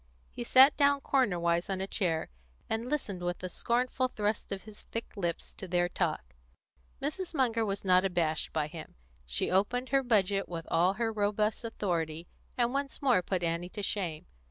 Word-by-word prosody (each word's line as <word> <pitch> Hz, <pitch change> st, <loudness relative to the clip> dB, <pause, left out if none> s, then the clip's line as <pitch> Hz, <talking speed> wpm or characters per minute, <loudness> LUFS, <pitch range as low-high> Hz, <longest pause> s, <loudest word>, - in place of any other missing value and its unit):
He 65 Hz, -, -5 dB
sat 265 Hz, -, +7 dB
down 285 Hz, -1 st, +4 dB
cornerwise 175 Hz, -10 st, +1 dB
on 190 Hz, -1 st, -1 dB
a 190 Hz, -, -1 dB
chair, 170 Hz, -, -1 dB, 0.4 s
and 225 Hz, +2 st, -2 dB
listened, 210 Hz, -11 st, -2 dB
with 175 Hz, +1 st, -3 dB
a 185 Hz, -, -2 dB
scornful 250 Hz, +6 st, 0 dB
thrust 210 Hz, -3 st, -2 dB
of 195 Hz, -1 st, -4 dB
his 215 Hz, -1 st, -12 dB
thick 230 Hz, -, -4 dB
lips, 170 Hz, -5 st, -3 dB
to 190 Hz, -, -8 dB
their 175 Hz, 0 st, +2 dB
talk. 155 Hz, -, -2 dB, 0.7 s
Mrs. 335 Hz, +5 st, -3 dB
Munger 235 Hz, -4 st, +2 dB
was 200 Hz, -2 st, -3 dB
not 185 Hz, 0 st, +5 dB
abashed 170 Hz, -5 st, 0 dB
by 155 Hz, -2 st, 0 dB
him. 155 Hz, +1 st, -9 dB, 0.3 s
She 60 Hz, +1 st, -1 dB
opened 240 Hz, +7 st, +1 dB
her 275 Hz, 0 st, +3 dB
budget 200 Hz, -5 st, +2 dB
with 165 Hz, -2 st, -5 dB
all 180 Hz, +3 st, +4 dB
her 225 Hz, +2 st, -1 dB
robust 210 Hz, +2 st, 0 dB
authority, 170 Hz, -7 st, -2 dB, 0.3 s
and 240 Hz, 0 st, +2 dB
once 275 Hz, 0 st, -2 dB
more 250 Hz, -8 st, +4 dB
put 180 Hz, 0 st, -2 dB
Annie 170 Hz, +1 st, -1 dB
to 205 Hz, +2 st, -6 dB
shame. 175 Hz, -6 st, -1 dB
195 Hz, 180 wpm, -31 LUFS, 175-235 Hz, 0.7 s, sat